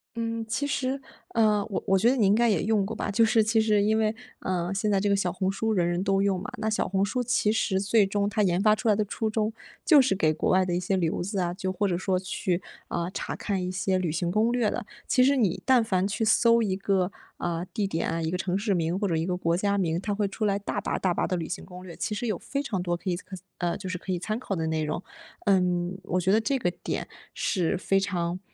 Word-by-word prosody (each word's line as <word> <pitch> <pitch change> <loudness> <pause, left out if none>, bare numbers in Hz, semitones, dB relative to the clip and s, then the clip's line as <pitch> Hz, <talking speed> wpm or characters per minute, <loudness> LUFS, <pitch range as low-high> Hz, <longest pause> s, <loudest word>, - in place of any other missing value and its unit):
嗯， 230 0 -2
其 225 +6 -1
实， 270 -1 -1 0.4
嗯， 215 -2 +4
我 195 - -3
我 195 -1 +3
觉 225 +5 +4
得 260 - +2
你 225 -6 +3
应 195 - +5
该 235 +2 +3
也 195 -7 +1
用 215 -1 +2
过 210 +3 -4
吧， - - -3
就 215 +3 +4
是 225 0 +4
其 220 +1 +2
实 210 -2 +3
因 220 +1 +2
为， 215 0 +1 0.2
嗯， 180 0 -2
现 205 +2 0
在 200 -1 +3
这 205 - 0
个 200 - +4
小 185 -3 0
红 190 0 -1
书 220 +3 -1
人 175 -4 +2
人 175 +1 0
都 195 0 +2
用 195 -2 +1
嘛。 - - -6
那 220 - -2
小 215 - 0
红 195 +1 +1
书 250 +5 -1
其 235 -3 +1
实 195 -3 +1
最 205 +2 +3
终 200 +1 0
它 210 +1 0
研 180 -3 +2
发 215 +1 +4
出 230 - -4
来 210 - +5
的 210 0 0
初 220 +2 -2
衷， 215 0 -1 0.3
就 300 -5 +7
是 250 -7 +2
给 155 -4 +2
国 155 - -1
外 185 0 +4
的 175 -1 -1
一 - - +1
些 185 +2 0
留 170 -2 0
子 195 +3 -3
啊， 175 -1 0
就 185 +1 -3
或 200 +2 0
者 180 - 0
说 190 -1 0
去， 180 -1 -2 0.3
呃， 170 +1 -3
查 - - -4
看 195 -3 -2
一 180 - -2
些 185 0 0
旅 175 -4 -1
行 170 +2 -1
攻 215 +4 +2
略 240 -3 +1
的。 245 - -3 0.2
其 255 - +4
实 275 +2 +4
你 215 -10 +1
但 255 -3 +5
凡 190 -3 +1
去 220 +2 -1
搜 230 +1 +4
一 195 -3 0
个， 195 -1 0 0.3
啊， 170 -1 -2
地 205 +2 -2
点 165 -4 -1
啊， 165 +1 -1
一 160 0 -2
个 180 - -1
城 185 0 0
市 200 0 0
名， 170 0 0
或 205 0 0
者 170 - 0
一 160 - 0
个 180 0 -1
国 170 -2 +1
家 200 +2 +1
名， 170 -3 0
它 205 0 -2
会 205 0 0
出 215 +3 -3
来 200 -1 +2
大 200 - -3
把 - - -2
大 185 -2 +1
把 - - 0
的 185 - -1
旅 165 -2 -4
行 - - -5
攻 180 0 -11
略， 175 -3 -9
其 210 - -3
实 240 - -3
有 215 -6 -1
非 280 +1 -3
常 205 -9 -2
多 175 -1 -1
可 185 +2 -3
以 - - 0
参 190 +1 -8 0.2
呃， 175 -1 -1
就 190 - -7
是 185 -1 -3
可 190 - -5
以 180 - 0
参 215 +5 -3
考 200 -6 -3
的 165 -2 -2
内 160 -1 -1
容。 155 +4 -3 0.4
嗯， 180 -2 +2
我 185 -1 -1
觉 185 +1 +1
得 220 +2 +4
这 270 +5 0
个 180 -8 0
点 - - -4 0.3
是， 185 0 0
非 195 +1 +1
常 180 -2 -2
195 Hz, 300 characters per minute, -27 LUFS, 180-215 Hz, 0.4 s, 就